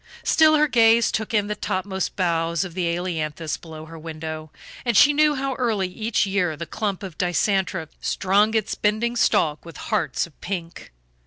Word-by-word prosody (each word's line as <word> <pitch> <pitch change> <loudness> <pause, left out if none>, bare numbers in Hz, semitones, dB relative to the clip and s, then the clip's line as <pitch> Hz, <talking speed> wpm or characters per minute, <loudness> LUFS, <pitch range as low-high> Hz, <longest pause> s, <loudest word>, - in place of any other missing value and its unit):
Still, 310 -1 +5
her 300 0 +4
gaze 230 -3 +4
took 220 -1 -2
in 210 -2 +2
the 210 - -2
topmost 190 -2 -3
boughs 170 -2 0
of 185 -3 -7
the 175 -1 -1
ailanthus 165 -3 -2
below 160 -2 -10
her 165 0 -11
window, 155 -1 -6 0.3
and 240 -4 +1
she 290 - +7
knew 300 0 +3
how 270 0 -2
early 220 -6 +1
each 215 +4 0
year 185 -5 0
the 170 - -5
clump 200 +1 -3
of 185 -5 -8
dicentra 185 -1 0
strung 205 +3 +2
its 220 -2 0
bending 215 +3 0
stalk 155 -9 +2
with 165 -3 -11
hearts 150 -5 -1
of 170 - -20
pink. 175 -3 -6
190 Hz, 175 wpm, -23 LUFS, 165-220 Hz, 0.3 s, she